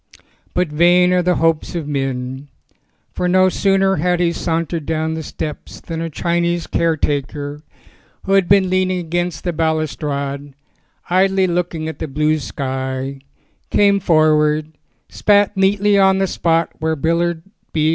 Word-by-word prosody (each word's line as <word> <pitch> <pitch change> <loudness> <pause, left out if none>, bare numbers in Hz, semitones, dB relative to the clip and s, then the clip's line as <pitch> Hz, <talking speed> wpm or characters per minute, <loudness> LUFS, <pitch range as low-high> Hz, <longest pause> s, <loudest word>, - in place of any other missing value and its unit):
But 180 -2 +1
vain 175 +4 +4
are 180 - +3
the 180 0 +1
hopes 165 +1 0
of 160 -4 -3
men. 135 -1 -3 0.7
For 180 - -1
no 185 +1 +4
sooner 195 0 +2
had 175 +2 +1
he 175 -1 +2
sauntered 165 -1 -2
down 160 0 -1
the 160 - -4
steps 150 0 -7
than 165 -1 -6
a 165 - -3
Chinese 170 +2 -1
caretaker 145 -2 -2 0.6
who 195 - -4
had 195 -3 +3
been 195 -1 +5
leaning 185 0 +1
against 175 -1 -3
the 175 - -2
balustrade, 145 -3 -2 0.6
idly 190 +1 +3
looking 175 -3 -2
at 160 - -6
the - - -3
blue 155 +2 0
sky, 130 -1 -4 0.5
came 200 -1 +3
forward, 155 -3 +2 0.3
spat 205 0 +2
neatly 200 +1 +3
on 190 -1 +4
the 195 - +1
spot 165 -2 0
where 160 0 0
Willard 165 +2 0 0.3
B. 155 -1 +1
165 Hz, 145 wpm, -18 LUFS, 150-180 Hz, 0.7 s, been